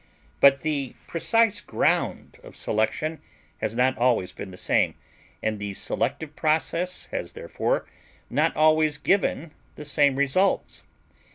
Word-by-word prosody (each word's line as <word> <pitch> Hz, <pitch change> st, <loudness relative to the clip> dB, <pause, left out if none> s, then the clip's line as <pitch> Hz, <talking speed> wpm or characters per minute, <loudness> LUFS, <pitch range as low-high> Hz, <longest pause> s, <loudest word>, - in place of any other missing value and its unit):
But 140 Hz, -1 st, +6 dB
the 145 Hz, -4 st, -2 dB
precise 215 Hz, +3 st, +2 dB
ground -, -, -1 dB
of -, -, -13 dB
selection 155 Hz, +9 st, -1 dB, 0.4 s
has 110 Hz, +1 st, -2 dB
not 125 Hz, +1 st, +2 dB
always 120 Hz, -7 st, +2 dB
been 95 Hz, -, -7 dB
the 90 Hz, -, -11 dB
same, -, -, +1 dB, 0.5 s
and 110 Hz, -1 st, -1 dB
the 100 Hz, -1 st, -5 dB
selective 150 Hz, +7 st, -2 dB
process 165 Hz, +4 st, 0 dB
has -, -, -4 dB
therefore -, -, -2 dB, 0.4 s
not -, -, +1 dB
always 155 Hz, -1 st, +4 dB
given 170 Hz, -1 st, 0 dB, 0.2 s
the 150 Hz, -, -9 dB
same 145 Hz, -2 st, +3 dB
results. 140 Hz, +8 st, +1 dB
150 Hz, 125 wpm, -25 LUFS, 130-165 Hz, 0.5 s, But